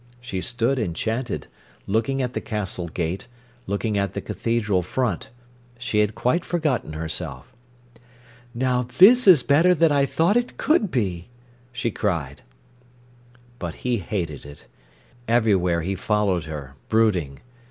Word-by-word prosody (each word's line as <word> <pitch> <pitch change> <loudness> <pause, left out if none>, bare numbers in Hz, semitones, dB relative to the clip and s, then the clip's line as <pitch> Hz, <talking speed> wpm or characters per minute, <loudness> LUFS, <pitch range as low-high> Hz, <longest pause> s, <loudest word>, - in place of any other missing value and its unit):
She 120 -7 -5
stood 120 +5 0
enchanted, 110 +5 -2 0.4
looking 115 +6 0
at 125 0 -3
the - - -3
castle 95 -5 -3
gate, 85 +5 -3 0.4
looking 100 +1 -1
at 100 -2 -1
the - - -1
cathedral 105 -5 0
front. 105 +1 -2 0.5
She 120 -3 -1
had 105 0 +1
quite 165 +8 +1
forgotten 150 - -1
herself. 80 -4 -5 1.0
"Now 125 0 +1 0.2
this 235 +7 +8
is 170 -9 +8
better 165 +6 +4
than 165 -1 +4
I 140 -1 +3
thought 170 +9 +2
it 245 0 -2
could 300 - +2
be!" 95 - -2 0.4
she 125 -2 -2
cried. 80 - -2 1.2
But 85 -1 -5
he 125 -1 +2
hated 85 -6 -4
it. 70 -2 -12 0.6
Everywhere 100 -7 +2
he 95 +4 -2
followed 95 -3 0
her, 75 -4 -7 0.2
brooding. 95 -11 +2
105 Hz, 130 wpm, -23 LUFS, 90-125 Hz, 1.2 s, this